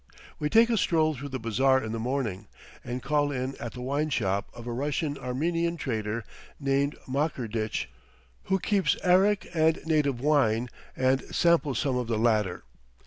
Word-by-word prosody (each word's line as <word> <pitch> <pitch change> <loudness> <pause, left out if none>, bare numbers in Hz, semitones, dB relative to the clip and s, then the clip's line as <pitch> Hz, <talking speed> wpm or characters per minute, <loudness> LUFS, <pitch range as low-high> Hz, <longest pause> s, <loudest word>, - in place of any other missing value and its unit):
We 150 - -1
take 230 +5 +5
a 230 - +2
stroll 155 -3 +2
through 140 +1 -7
the 130 - -3
bazaar 130 +4 +3
in 110 - -4
the 115 - -3
morning, 110 -5 -2 0.4
and 120 0 -5
call 145 0 +1
in 130 0 -3
at 120 - -6
the 125 - -7
wine 145 +4 0
shop 100 -7 -1
of 120 - -11
a 120 - -3
Russian 145 +3 -1
Armenian 165 +7 -1
trader 110 -6 -2 0.4
named 140 0 +1
Makerditch, 125 -6 -2 0.6
who 190 - +2
keeps 190 -5 +1
arrack 190 +3 +4
and 160 -1 +3
native 150 -5 +1
wine, 125 -5 +2 0.3
and 130 +1 +2
sample 170 -5 +2
some 130 +2 0
of 125 -2 -2
the 115 -2 0
latter. 110 -5 +1
135 Hz, 165 wpm, -27 LUFS, 120-155 Hz, 0.6 s, take